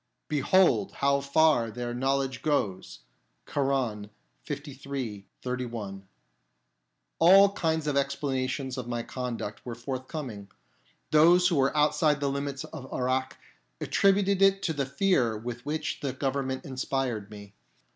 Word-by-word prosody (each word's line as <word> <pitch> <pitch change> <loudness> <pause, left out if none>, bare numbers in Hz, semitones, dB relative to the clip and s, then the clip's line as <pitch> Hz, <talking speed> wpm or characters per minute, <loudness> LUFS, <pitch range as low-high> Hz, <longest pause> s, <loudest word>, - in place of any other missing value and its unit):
" - - -53
Behold 185 +6 +3
how 140 0 +1
far 140 -4 +3
their 120 +2 -4
knowledge 135 0 -1
goes! 105 -12 -1 0.2
" - - -46
(Koran, 130 -7 -1 0.4
liii. 135 -7 -5 0.2
31). 115 -6 -5 1.1
All 195 +4 +7
kinds 160 -5 -1
of 150 -2 0
explanations 135 -1 -1
of 125 - -6
my 120 -1 -2
conduct 120 -5 -5
were 120 -2 -6
forthcoming. 130 -4 -6 0.6
Those 175 +4 +6
who 170 - +1
were 135 +2 +2
outside 150 0 +3
the 140 -1 0
limits 140 0 -3
of 130 -1 -9
Irak 130 +1 -1 0.4
attributed 195 0 +2
it 195 0 +4
to 160 - 0
the 140 -3 -2
fear 135 - +1
with 120 +4 -7
which 155 +1 -2
the 140 -3 -3
Government 135 -1 -2
inspired 130 -5 -2
me. 100 -1 -11
135 Hz, 130 wpm, -28 LUFS, 120-150 Hz, 1.1 s, All